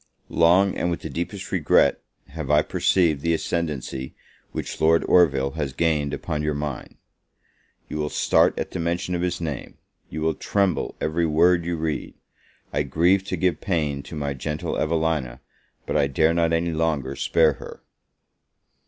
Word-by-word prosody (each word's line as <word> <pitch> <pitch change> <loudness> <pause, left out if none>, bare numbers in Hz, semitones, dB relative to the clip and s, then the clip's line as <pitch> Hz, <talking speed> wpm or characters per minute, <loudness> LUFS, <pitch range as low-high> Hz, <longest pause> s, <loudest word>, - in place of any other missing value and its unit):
Long, 90 +4 +4
and 90 - -1
with 85 - -3
the 80 - -6
deepest 90 +6 -5
regret, 85 -7 +3 0.3
have 75 -1 -6
I 75 +1 +4
perceived 80 -7 +2
the 85 +1 +1
ascendancy 75 -6 -3 0.4
which - - -5
Lord 80 +1 +4
Orville 70 -6 +4
has 75 -4 -3
gained 75 -1 +1
upon 75 -1 -3
your 75 -1 -1
mind. 75 -3 -5 0.9
You 75 - -5
will 75 0 -1
start - - +3
at - - -3
the - - -4
mention 85 +2 -1
of 85 - -1
his 90 -1 -1
name, 75 -6 -5 0.3
you 80 - -5
will 80 0 +1
tremble 100 -4 0
every 80 +2 0
word 85 +2 +3
you 85 -1 -2
read; 80 -1 -3 0.6
I - - +1
grieve 85 +7 +2
to 95 - -3
give 90 -2 0
pain 75 -7 -1
to 80 - -9
my 70 -2 -2
gentle 75 +3 -4
Evelina, 80 -6 -1 0.5
but - - -3
I 70 - +3
dare 80 +4 +2
not 85 -1 +2
any 85 +1 +1
longer 75 -4 -1
spare 80 0 +3
her. - - -10
80 Hz, 165 wpm, -24 LUFS, 75-85 Hz, 0.9 s, Long